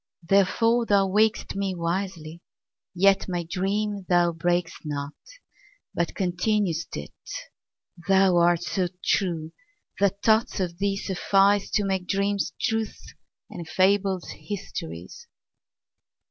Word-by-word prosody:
Therefore 225 Hz, +5 st, +3 dB
thou 200 Hz, -1 st, +4 dB
waked'st 215 Hz, +3 st, +1 dB
me 195 Hz, -1 st, -1 dB
wisely; 170 Hz, -2 st, -3 dB, 0.6 s
yetMy 185 Hz, -2 st, +2 dB
dream 195 Hz, +2 st, -2 dB
thou 175 Hz, -1 st, +4 dB
brak'st 175 Hz, +1 st, -1 dB
not, 145 Hz, -1 st, -4 dB, 0.8 s
but 170 Hz, -, -2 dB
continued'st 180 Hz, -2 st, -1 dB
it:Thou 185 Hz, -, -2 dB
art 175 Hz, 0 st, +3 dB
so 185 Hz, 0 st, -1 dB, 0.2 s
true 165 Hz, -5 st, 0 dB, 0.5 s
that 200 Hz, 0 st, +1 dB
thoughts 220 Hz, -1 st, +3 dB
of 175 Hz, -2 st, -3 dB
thee 200 Hz, 0 st, 0 dB
sufficeTo 200 Hz, +2 st, +2 dB
make 190 Hz, -2 st, -1 dB
dreams 200 Hz, +1 st, 0 dB
truths 225 Hz, -1 st, -3 dB, 0.4 s
and 170 Hz, -6 st, -8 dB
fables 190 Hz, -1 st, +2 dB
histories. 90 Hz, -, -7 dB
190 Hz, 100 wpm, -25 LUFS, 175-200 Hz, 0.8 s, thou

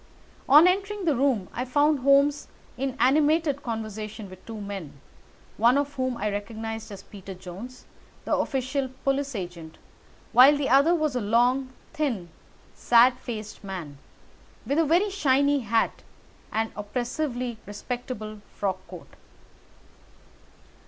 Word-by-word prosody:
On 300 Hz, +5 st, +9 dB
entering 395 Hz, +1 st, 0 dB
his 315 Hz, -, +3 dB
room, 250 Hz, -7 st, +1 dB
I 245 Hz, -, -2 dB
found 290 Hz, +3 st, +2 dB
Holmes 280 Hz, +2 st, +3 dB, 0.3 s
in 265 Hz, 0 st, -3 dB
animated 290 Hz, +3 st, +3 dB
conversation 215 Hz, -3 st, -6 dB
with 185 Hz, -, -13 dB
two 225 Hz, -1 st, -6 dB
men, 195 Hz, -9 st, -7 dB, 0.6 s
one 240 Hz, +4 st, +4 dB
of 285 Hz, 0 st, -1 dB
whom 255 Hz, -2 st, -2 dB
I 210 Hz, -1 st, -1 dB
recognised 220 Hz, +2 st, -5 dB
as 195 Hz, -1 st, -9 dB
Peter 195 Hz, -2 st, -10 dB
Jones, 190 Hz, +8 st, -10 dB, 0.4 s
the -, -, +1 dB
official 265 Hz, 0 st, -1 dB
police 275 Hz, -1 st, 0 dB
agent, 175 Hz, -4 st, -7 dB, 0.5 s
while 270 Hz, +4 st, +7 dB
the 285 Hz, -1 st, -1 dB
other 280 Hz, +6 st, +5 dB
was 310 Hz, -5 st, -1 dB
a 250 Hz, -, 0 dB
long, 245 Hz, +5 st, +2 dB, 0.2 s
thin, 255 Hz, -, -2 dB, 0.4 s
sad 245 Hz, +1 st, +4 dB
faced 215 Hz, -5 st, -7 dB
man, 170 Hz, -8 st, -7 dB, 0.7 s
with 285 Hz, +3 st, +1 dB
a 330 Hz, -, +4 dB
very 355 Hz, +7 st, +2 dB
shiny 285 Hz, -5 st, +2 dB
hat 225 Hz, -2 st, 0 dB, 0.5 s
and 225 Hz, +1 st, -1 dB
oppressively 245 Hz, +2 st, -3 dB
respectable 215 Hz, 0 st, -6 dB
frock 190 Hz, -2 st, -2 dB
coat. 180 Hz, 0 st, -11 dB
245 Hz, 130 wpm, -26 LUFS, 210-280 Hz, 0.7 s, On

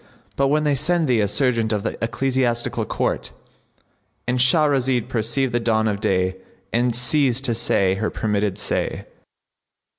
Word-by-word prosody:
But 140 Hz, -, +2 dB
when 150 Hz, +2 st, +1 dB
they 150 Hz, -1 st, +2 dB
send 160 Hz, +4 st, +1 dB
thee 125 Hz, -3 st, +2 dB
a 105 Hz, -, +2 dB
serjeant 115 Hz, 0 st, +1 dB
of 105 Hz, -2 st, -1 dB
the -, -, -3 dB
Ecclesiastical 120 Hz, 0 st, -1 dB
Court,"—And 125 Hz, +1 st, -6 dB
Shahrazad 130 Hz, -3 st, +2 dB
perceived 120 Hz, +2 st, -1 dB
the 120 Hz, -, +2 dB
dawn 110 Hz, -1 st, +1 dB
of 105 Hz, -1 st, -2 dB
day 95 Hz, -3 st, 0 dB, 0.4 s
and 120 Hz, 0 st, +1 dB
ceased 130 Hz, +1 st, +2 dB
to 120 Hz, -, +1 dB
say 100 Hz, -4 st, +1 dB
her 105 Hz, +3 st, -2 dB
permitted 105 Hz, -2 st, -1 dB
say. -, -, -2 dB
120 Hz, 145 wpm, -21 LUFS, 110-135 Hz, 0.4 s, But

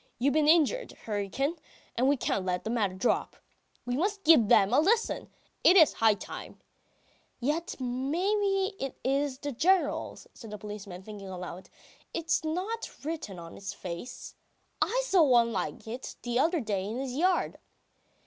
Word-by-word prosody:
You've 270 Hz, +4 st, +2 dB
been 305 Hz, -1 st, +3 dB
injured, 340 Hz, +11 st, +3 dB
Hryukin, 225 Hz, -, -1 dB, 0.4 s
and 255 Hz, +3 st, +3 dB
we 285 Hz, -, +3 dB
can't 195 Hz, -5 st, -1 dB
let 180 Hz, -1 st, -1 dB
the 220 Hz, -, -3 dB
matter 205 Hz, -6 st, 0 dB
drop.... 190 Hz, +6 st, 0 dB, 0.5 s
We 245 Hz, 0 st, -1 dB
must 395 Hz, +6 st, -1 dB
give 305 Hz, -9 st, +6 dB
them 200 Hz, +2 st, +5 dB
a -, -, +6 dB
lesson! 440 Hz, +9 st, +1 dB, 0.3 s
It 370 Hz, -, +7 dB
is 320 Hz, -4 st, +7 dB
high 220 Hz, -2 st, +4 dB
time.... -, -, -9 dB, 0.4 s
!" -, -, -37 dB
"Yet 300 Hz, +7 st, -1 dB
maybe 380 Hz, -, 0 dB
it 270 Hz, -, -4 dB
is 275 Hz, 0 st, 0 dB
the 285 Hz, +1 st, -4 dB
General's," 360 Hz, +9 st, +1 dB
says 225 Hz, -, -11 dB
the 210 Hz, -, -6 dB
policeman, 200 Hz, -3 st, -8 dB
thinking 200 Hz, -2 st, -9 dB
aloud. 180 Hz, 0 st, -7 dB, 0.5 s
"It's 330 Hz, -1 st, 0 dB
not 370 Hz, +9 st, -3 dB, 0.2 s
written 300 Hz, -, -4 dB
on 165 Hz, -1 st, -9 dB
its 195 Hz, -, -6 dB
face.... 175 Hz, +7 st, -7 dB, 0.5 s
I -, -, +2 dB
saw 390 Hz, -7 st, +4 dB
one 240 Hz, -6 st, +5 dB
like 185 Hz, -3 st, -3 dB
it 245 Hz, +4 st, -6 dB
the 240 Hz, 0 st, 0 dB
other 330 Hz, +3 st, +2 dB
day 205 Hz, -4 st, -2 dB
in 215 Hz, +4 st, -4 dB
his 260 Hz, -1 st, -3 dB
yard." 360 Hz, +7 st, +1 dB
260 Hz, 165 wpm, -29 LUFS, 210-330 Hz, 0.5 s, It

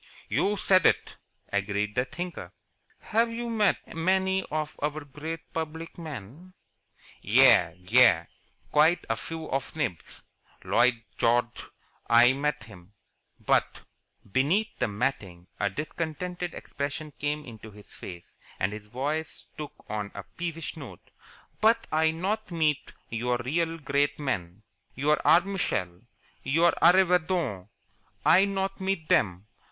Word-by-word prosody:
"You 205 Hz, +1 st, +1 dB
said 185 Hz, -2 st, +4 dB
it," -, -, 0 dB, 0.4 s
agreed 100 Hz, +1 st, -1 dB
the 125 Hz, +3 st, +1 dB
Thinker. 170 Hz, -, -6 dB, 0.5 s
"Have 230 Hz, +2 st, +1 dB
you 235 Hz, +1 st, -4 dB
met 215 Hz, -7 st, 0 dB
many 190 Hz, +3 st, +2 dB
of 155 Hz, 0 st, -3 dB
our 150 Hz, +1 st, -1 dB
great 155 Hz, +4 st, -6 dB
public 160 Hz, +1 st, -5 dB
men?" 155 Hz, -, -9 dB, 0.7 s
"Yais 85 Hz, -2 st, +5 dB
Yais 90 Hz, -2 st, +5 dB, 0.5 s
Quite 160 Hz, +3 st, +4 dB
a -, -, +1 dB
few 160 Hz, +6 st, -6 dB
of 135 Hz, 0 st, -1 dB
the -, -, -12 dB
nibs 115 Hz, -, -4 dB, 0.4 s
Lloyid 120 Hz, -1 st, +2 dB, 0.2 s
Gorge, 120 Hz, +1 st, +1 dB, 0.4 s
I 120 Hz, +2 st, +7 dB
meet 145 Hz, -3 st, -1 dB
him. 100 Hz, -3 st, -15 dB, 0.5 s
But -, -, +1 dB, 0.2 s
" 100 Hz, -, -28 dB
Beneath 180 Hz, +12 st, +2 dB
the -, -, +1 dB
matting 100 Hz, -6 st, -3 dB
a 100 Hz, -, +1 dB
discontented 165 Hz, -, -4 dB
expression 145 Hz, +2 st, -5 dB
came 150 Hz, +1 st, -2 dB
into 110 Hz, -2 st, -10 dB
his 105 Hz, 0 st, -13 dB
face, 85 Hz, -2 st, -11 dB, 0.2 s
and 95 Hz, +2 st, 0 dB
his 105 Hz, -1 st, -8 dB
voice 145 Hz, +7 st, -3 dB
took 150 Hz, -1 st, -9 dB
on 105 Hz, -1 st, -3 dB
a 100 Hz, -, -6 dB
peevish 165 Hz, -, -5 dB
note. 145 Hz, -5 st, -11 dB, 0.5 s
"But 225 Hz, +2 st, +4 dB
I 160 Hz, +1 st, +3 dB
not 195 Hz, +7 st, -2 dB
meet 155 Hz, -4 st, 0 dB, 0.2 s
your 120 Hz, +2 st, 0 dB
real 165 Hz, +7 st, -1 dB
great 145 Hz, -1 st, 0 dB
men 100 Hz, -, -3 dB, 0.3 s
your 150 Hz, +3 st, +2 dB
Arbmishel, 140 Hz, -, +1 dB, 0.3 s
your 165 Hz, +5 st, +3 dB
Arreevadon 175 Hz, -, +3 dB, 0.6 s
I 185 Hz, +4 st, +6 dB
not 195 Hz, 0 st, -2 dB
meet 190 Hz, -4 st, -1 dB
them. 95 Hz, -1 st, +2 dB
150 Hz, 130 wpm, -27 LUFS, 115-170 Hz, 0.7 s, I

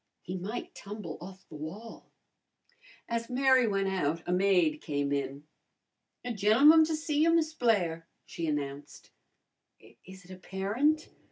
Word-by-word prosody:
He 180 Hz, -, -5 dB
might 195 Hz, +6 st, -5 dB
tumble 200 Hz, -5 st, -8 dB
off 190 Hz, +2 st, -11 dB
the -, -, -15 dB
wall." 190 Hz, +10 st, -9 dB, 1.0 s
As 230 Hz, 0 st, -3 dB
Mary 260 Hz, -1 st, +4 dB
went 195 Hz, -2 st, 0 dB
out 165 Hz, -4 st, -1 dB
a -, -, -1 dB
maid 180 Hz, -5 st, +2 dB
came 145 Hz, -1 st, -2 dB
in. 140 Hz, 0 st, -3 dB, 0.8 s
"A 245 Hz, -, -2 dB
gen'l'mun 245 Hz, +11 st, +6 dB
to 320 Hz, 0 st, -1 dB
see 305 Hz, -1 st, -2 dB
you, 330 Hz, +1 st, +5 dB
Miss 320 Hz, -1 st, +2 dB
Blair," 180 Hz, -, 0 dB, 0.2 s
she 165 Hz, -, -5 dB
announced. 145 Hz, -1 st, -5 dB, 0.9 s
"Is 190 Hz, 0 st, -13 dB
it 185 Hz, -, -14 dB
a 185 Hz, -, -9 dB
parent?" 225 Hz, -, 0 dB
195 Hz, 145 wpm, -30 LUFS, 165-245 Hz, 1.0 s, gen'l'mun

